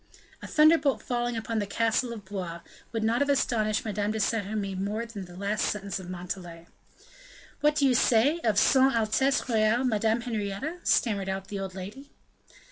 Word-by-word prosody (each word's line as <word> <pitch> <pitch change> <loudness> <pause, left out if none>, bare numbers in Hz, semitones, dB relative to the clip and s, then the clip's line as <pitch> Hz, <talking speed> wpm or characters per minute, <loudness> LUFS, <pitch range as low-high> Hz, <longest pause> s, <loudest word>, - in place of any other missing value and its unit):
A - - -7
thunderbolt 305 -2 +4
falling 240 -1 -1
upon 225 0 -2
the 205 - -2
castle 230 +3 0
of 215 -4 -8
Blois 180 -4 -5 0.3
would 225 -2 -2
not 230 +4 +1
have 285 - +1
astonished 220 -6 +1
Madame 210 -1 -1
de 220 +1 -2
Saint 210 -1 0
Remy 205 -2 -3
more 205 +4 -3
than 210 -5 -8
the 175 0 -13
last 200 +2 -1
sentence 200 -2 -3
of 180 -1 -9
Montalais. 175 -2 -7 0.9
"What 300 0 +3
do 285 - +2
you 260 - +4
say? 250 +6 +3
of 220 -9 0
Son 265 +3 +4
Altesse 230 +6 +1
Royale 225 +1 +2
Madame 225 -1 +1
Henrietta?" 230 - -4
stammered 200 - +1
out 190 0 -4
the 200 - -4
old 190 -1 -5
lady. 210 +10 -8
220 Hz, 180 wpm, -27 LUFS, 200-245 Hz, 0.9 s, thunderbolt